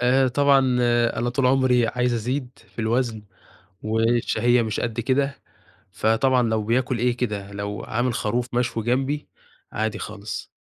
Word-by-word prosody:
آآ 130 +2 +3
طبعًا 140 +1 +4 0.6
أنا 120 +1 0
طول 125 +1 +1
عمري 125 -2 +3
عايز 125 +1 0
أزيد 125 +3 -2 0.2
في - - -29
الوزن، 115 0 0 0.6
والشهية 115 +2 +2
مش 110 -2 -2
قد 115 0 -2
كده، 135 +3 0 0.5
فطبعًا 115 +5 +2
لو 110 -2 0
بياكل 120 +2 0
إيه 120 0 +1
كده، 105 -5 -3
لو 100 -1 -5
عامل 120 +2 -1
خروف 120 +2 -2
مشوي 120 -2 -1
جنبي، 135 +5 -1 0.4
عادي 110 0 -2
خالص، 110 0 -7
120 Hz, 140 wpm, -23 LUFS, 110-125 Hz, 0.6 s, طبعًا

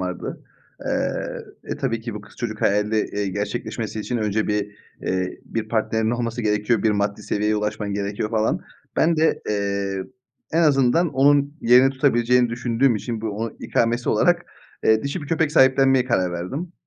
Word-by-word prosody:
vardı. 90 -1 -5 0.4
Eee, - - -3
e, - - -4
tabii 115 -1 -2
ki 115 -1 -6
bu 105 - -6
kız 100 - -17
çocuk 110 -3 -4
hayali, 105 +2 +2
eee, 105 -1 -2
gerçekleşmesi 110 +2 -4
için 120 +3 -3
önce 110 0 0
bir, 105 0 -1 0.3
eee, 95 0 -2
bir 110 -1 -4
partnerinin 110 0 0
olması 120 0 -2
gerekiyor, 105 +1 +1
bir 110 - +3
maddi 100 0 -1
seviyeye 105 +1 0
ulaşman 105 -1 -2
gerekiyor 100 +1 -2
falan. 110 -1 +1 0.4
Ben 165 0 +3
de, 160 +1 +2
eee, 100 -2 -1 0.5
en 165 +1 +3
azından 145 +3 +3
onun 140 +1 +4
yerini 125 +3 +6
tutabileceğini 125 -2 +3
düşündüğüm 120 +1 +1
için 110 +2 -4
bu 110 -1 -2
onun 110 +3 -4
ikamesi 120 +1 0
olarak, - - +2 0.4
eee, 110 0 +4
dişi 140 +4 -3
bir 145 - -7
köpek 160 -2 +1
sahiplenmeye 135 -2 +5
karar 95 -8 +1
verdim. 135 - -5
110 Hz, 165 wpm, -22 LUFS, 105-125 Hz, 0.5 s, yerini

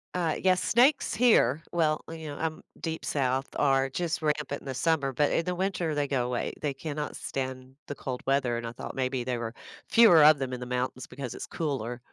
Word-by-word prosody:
Uh, 170 -3 0
yes, 185 -1 +3
snakes 260 +2 +3
here, 165 - +4
well, 155 -3 +1
you 160 -1 -7
know, 145 -1 -6
um, 160 -1 -3 0.2
deep 160 -1 -4
South 135 -1 0
are 135 -1 +3
just 170 +3 -2
rampant 150 -2 -1
in - - -16
the 135 - -3
summer, 145 -1 +1
but 145 +3 +1
in 165 - +1
the 180 +1 -2
winter, 180 -4 -1
they 145 -1 0
go 130 -3 0
away. 125 -1 -2
They 145 -2 0
cannot 150 +2 -5
stand 130 -1 -5
the 145 - -5
cold 130 -2 -5
weather 135 -3 +2
and 115 0 -4
I 115 - -6
thought - - -7
maybe 130 -1 -1
there 125 -1 -2
were 115 0 -5 0.3
fewer 195 -9 +7
of 155 0 +8
them 130 -2 -3
in 125 - -4
the 125 - -6
mountains 125 0 -3
because 130 -1 -6
it's - - -7
cooler. 130 -6 -3
140 Hz, 220 wpm, -28 LUFS, 130-160 Hz, 0.3 s, of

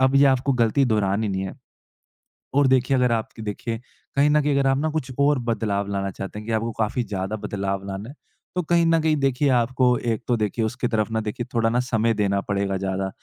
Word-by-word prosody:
अब 130 +1 +3
ये 140 - +6
आपको 135 +1 +2
गलती 125 +3 +2
दोहरानी 105 -2 +1
नहीं 95 0 -2
है। - - -7 1.0
और 140 -1 +4
देखिए 130 +1 +3
अगर 125 -2 +2
आपकी 110 0 -3
देखिए 110 +2 -4 0.4
कहीं 145 +1 +4
न 150 0 +4
कहीं 145 0 +1
अगर 135 - +2
आप 135 0 +2
ना 155 +1 0
कुछ 150 -5 -3
और 145 -1 +3
बदलाव 100 -3 -1
लाना 100 0 -1
चाहते 95 +2 -7
हैं 105 - -8
कि 115 - -2
आपको 115 +1 -1
काफ़ी 110 +3 0
ज़्यादा 95 +1 -3
बदलाव 100 -1 -3
लाना 100 +4 -5
है। 140 - -10 0.4
तो 180 - 0
कहीं 170 +1 +2
न 165 0 +4
कहीं 155 -1 +2
देखिए 135 0 +1
आपको 125 0 +3
एक 115 -3 -2
तो 120 - +3
देखिए 110 +1 -1
उसके 120 +2 -2
तरफ 110 -2 0
ना 110 - +1
देखिए 110 +2 -4
थोड़ा 115 -1 +2
ना 120 +1 +2
समय 115 -2 +1
देना 100 -1 +1
पड़ेगा 100 -1 -1
ज़्यादा। 95 0 -2
115 Hz, 225 wpm, -23 LUFS, 105-130 Hz, 1.0 s, ये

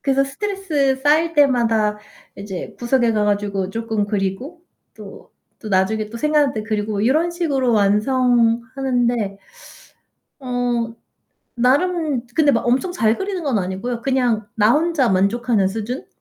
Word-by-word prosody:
그래서 275 0 +1
스트레스 300 -3 -1
쌓일 315 +3 +2
때마다 230 -7 +2 0.4
이제 195 -2 -7
구석에 240 -1 +1
가가주고 205 -2 -1
쪼끔 225 -1 -2
그리고 205 - -3 0.3
또 - - -12 0.3
또 220 - -6
나중에 210 +2 0
또 235 - -7
생각날 300 -1 +2
때 215 -1 -4
그리고 210 -1 -2
이런 305 +10 +2
식으로 290 -8 0
완성하는데 235 +1 +1 1.0
어 245 -3 -2 0.6
나름 285 +1 +1
근데 300 -3 +4
막 230 - 0
엄청 260 +9 +1
잘 225 -10 +1
그리는 385 -3 -3
건 265 -8 0
아니고요. 195 +6 -4
그냥 245 -5 0
나 215 +1 +4
혼자 305 -3 +2
만족하는 200 +2 +1
수준. 225 +6 -5
240 Hz, 285 characters per minute, -20 LUFS, 210-275 Hz, 1.0 s, 근데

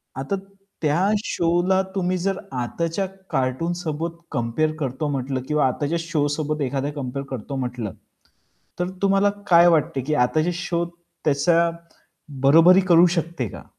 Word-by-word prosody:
आता 135 +9 -2 0.5
त्या 165 +5 +2 0.2
शोला 175 +3 +2
तुम्ही 185 -1 0
जर 195 +2 -1 0.2
आताच्या 165 +9 -2 0.3
कार्टून 135 +7 0
सोबत 165 +1 -3
कंपेअर 120 +7 0
करतो 135 +1 -2
म्हंटलं 135 -1 -2
किंवा 150 -2 +2
आताच्या 145 +5 -1
शो 165 -3 0
सोबत 150 +1 -2
एखाद्या 140 +2 -2
कंपेअर 140 -1 -4
करतो 130 +2 -5
म्हंटलं, 125 -5 -4 0.9
तर 180 0 -1
तुम्हाला 195 +1 +3 0.2
काय 170 -1 +7
वाटते 155 -5 +2
की 150 +4 -1
आता 155 +5 0
जे 175 +3 0
शो 170 0 -2 0.4
त्याचा 170 +4 +3 0.7
बरोबरी 165 +7 +7
करू 170 -1 +7
शकते 165 -7 -2
का? - - -10
155 Hz, 140 wpm, -23 LUFS, 135-175 Hz, 0.9 s, काय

